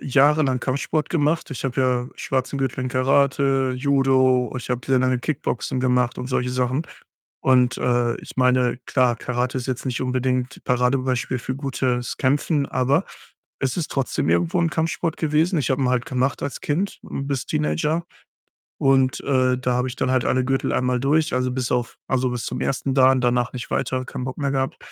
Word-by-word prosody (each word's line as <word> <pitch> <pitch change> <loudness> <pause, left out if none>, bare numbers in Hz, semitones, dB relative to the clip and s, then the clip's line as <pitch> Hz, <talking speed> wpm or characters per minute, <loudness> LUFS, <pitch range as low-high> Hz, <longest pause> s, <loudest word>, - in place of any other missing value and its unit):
jahrelang 140 -1 +3
Kampfsport 140 +4 -1
gemacht. 155 -1 0
Ich 135 - -5
habe 135 0 -2
ja 125 -1 +1
schwarzen 130 +1 -2
Gürtel 135 -1 -2
in - - -1
Karate, 135 0 +2
Judo, 130 -2 +2
ich 125 - -6
habe 125 -1 0
sehr 135 -1 +3
lange 130 0 +2
Kickboxen 130 -2 -2
gemacht 125 -1 +1
und 125 - -5
solche 125 -1 -1
Sachen 125 +5 -1 0.6
und, 130 -1 +3
äh, 120 -1 +1
ich - - -12
meine, 125 -1 +3
klar, 125 -3 +2
Karate 125 +1 -2
ist 130 0 -4
jetzt 130 +1 -3
nicht 125 -2 -2
unbedingt 130 0 -1
Paradebeispiel 125 0 0
für 130 +2 -4
gutes 130 -3 -2
Kämpfen, 140 +2 +1
aber 135 +1 +1 0.6
es 130 -2 -1
ist 170 - -3
trotzdem 135 -2 -1
irgendwo 175 +1 +2
'n 170 -1 +2
Kampfsport 165 +1 -1
gewesen. 160 +3 +1
Ich 135 - -1
habe 130 +1 +1
ihn 125 - +2
halt 125 -1 0
gemacht 130 +1 -1
als 140 - -4
Kind, 180 +7 -2
hm, 140 - -5
bis 140 -3 -2
Teenager 80 - 0 0.7
und, 135 -1 +3
äh, 130 -2 +2
da 125 0 -1
habe 125 +1 0
ich 130 - -6
dann 130 - -1
halt 130 -1 +1
alle 130 0 +2
Gürtel 135 0 0
einmal 125 0 +1
durch, 150 +4 +1
also, 125 0 0
bis 125 -1 -2
auf 120 -1 -1
also, 130 -1 +1
bis 120 -2 -3
zum - - -4
ersten 135 0 -1
Dan, 130 -1 +5
danach 120 0 +1
nicht 125 -2 -6
weiter, 130 0 -1
keinen 125 - -6
Bock 130 - -5
mehr 140 -2 -1
gehabt 135 -1 -1
130 Hz, 190 wpm, -22 LUFS, 125-140 Hz, 0.7 s, Dan